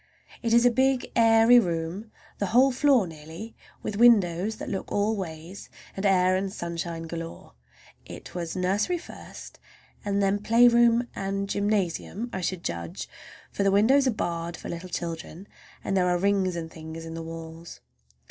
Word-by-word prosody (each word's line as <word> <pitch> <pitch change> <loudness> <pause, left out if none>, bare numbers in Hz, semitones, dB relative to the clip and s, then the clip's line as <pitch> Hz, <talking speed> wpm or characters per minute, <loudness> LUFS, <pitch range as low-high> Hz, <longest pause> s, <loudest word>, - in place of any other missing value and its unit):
It 230 - -1
is 235 +1 +5
a 245 - +6
big, 260 +1 +1
airy 225 +1 +6
room, 175 +2 -3 0.3
the 200 - 0
whole 255 +7 +4
floor 260 -4 +3
nearly, 160 +7 -10 0.3
with 205 - -4
windows 210 -4 +4
that - - -8
look 195 - -4
all 210 +2 +1
ways, 175 0 -7 0.3
and 195 +1 0
air 185 -1 +3
and 190 +1 -2
sunshine 170 -2 -5
galore. 165 - -8 0.5
It - - -11
was 170 -2 -4
nursery 195 - 0
first 335 - -11 0.4
and 200 -1 -1
then 200 0 +1
playground 235 +1 +5
and 195 0 -3
gymnasium, 205 +2 -1
I 190 - -3
should 180 0 -3
judge; 85 -1 -5 0.4
for - - -3
the 195 - +3
windows 245 +8 +4
are - - +4
barred 170 -6 -3
for - - -8
little 170 +2 -6
children, 170 +2 -6 0.4
and 195 - -1
there 180 -1 +3
are 180 0 +2
rings 190 -1 +1
and 165 -1 -5
things 160 0 -9
in 165 - -7
the 165 - -5
walls. 165 0 -9
195 Hz, 165 wpm, -26 LUFS, 170-225 Hz, 0.5 s, a